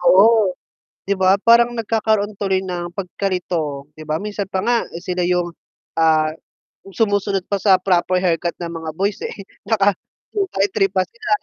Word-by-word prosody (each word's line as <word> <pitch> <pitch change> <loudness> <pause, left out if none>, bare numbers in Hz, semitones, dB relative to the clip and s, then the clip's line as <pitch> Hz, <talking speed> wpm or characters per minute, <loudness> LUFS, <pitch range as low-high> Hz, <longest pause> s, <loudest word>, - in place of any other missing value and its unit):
Oo, 195 +3 +5 0.5
'di 200 - +1
ba, 190 0 +5
parang 235 +1 +6
nagkakaroon 220 -2 0
tuloy 190 -2 +1
ng 175 -2 -5
pagkalito, 175 -7 -3
'di 155 - -9
ba 155 0 0
minsan 205 -1 -3
pa 190 -1 -2
nga 240 +3 +2 0.3
sila 180 -1 -2
'yung, 175 -1 +1 0.5
ah, 155 -1 +4 0.6
sumusunod 200 -1 0
pa 200 - -1
sa 190 -2 +5
proper 185 -1 +1
haircut 170 -1 0
ng 170 -1 -5
mga 160 -1 -5
boys, 200 +1 0
eh, - - -4 0.3
naka 205 -2 +3 0.4
2x3 200 - +1
pa 185 -1 +1
sila. 450 -3 -9
190 Hz, 150 wpm, -20 LUFS, 175-205 Hz, 0.6 s, parang